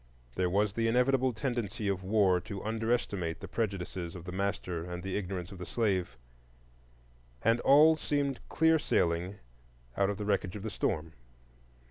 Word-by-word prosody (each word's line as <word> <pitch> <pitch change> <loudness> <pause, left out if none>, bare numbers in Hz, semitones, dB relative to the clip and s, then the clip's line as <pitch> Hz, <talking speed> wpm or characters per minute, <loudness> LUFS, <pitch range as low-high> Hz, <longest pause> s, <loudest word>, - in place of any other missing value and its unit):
There 90 +4 0
was 100 +2 +1
the 115 +1 0
inevitable 125 +2 +3
tendency 115 -3 -3
of 95 -1 0
war 95 -2 +3
to 100 +2 -7
underestimate 110 -6 -1
the - - -7
prejudices 95 -5 -3
of 90 - -8
the 90 - -5
master 95 -3 -2
and 90 0 -6
the 95 0 -3
ignorance 90 -3 -4
of 95 - -10
the 90 - -5
slave, 95 - 0 1.3
and 115 +2 +3
all 150 +5 +7
seemed 145 -3 -1
clear 160 0 +4
sailing 85 - 0 0.6
out 100 0 +2
of 100 - -2
the 105 - -4
wreckage 100 -2 0
of 100 - -6
the 110 - -3
storm. 80 -2 -2
100 Hz, 160 wpm, -31 LUFS, 90-115 Hz, 1.3 s, all